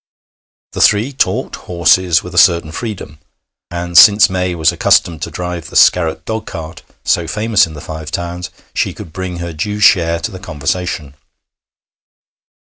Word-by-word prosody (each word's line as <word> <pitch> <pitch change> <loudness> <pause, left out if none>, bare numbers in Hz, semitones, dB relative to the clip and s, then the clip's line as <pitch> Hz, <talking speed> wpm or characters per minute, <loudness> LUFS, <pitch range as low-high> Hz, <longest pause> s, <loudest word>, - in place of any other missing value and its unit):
The - - -4
three 110 +7 +3
talked 135 - -1
horses 85 0 +2
with 90 - -9
a - - -6
certain 85 -4 +3
freedom, 90 -7 -7 0.5
and 85 0 -6
since 100 +4 +7
May 90 -1 -1
was 80 -1 +2
accustomed 80 -4 +1
to - - -4
drive 90 -2 -6
the - - -13
Scarratt 80 -2 +3
dogcart, 85 -8 -6 0.2
so 85 - 0
famous 105 +2 +1
in 80 - -11
the 75 - -9
Five 80 -1 -7
Towns, 85 0 -5 0.2
she - - -2
could 80 - -11
bring 95 -1 -5
her 85 -1 -6
due 105 +7 -4
share 85 -5 +3
to 110 - -4
the 95 - -9
conversation. 75 -2 -4
85 Hz, 155 wpm, -15 LUFS, 80-95 Hz, 0.5 s, since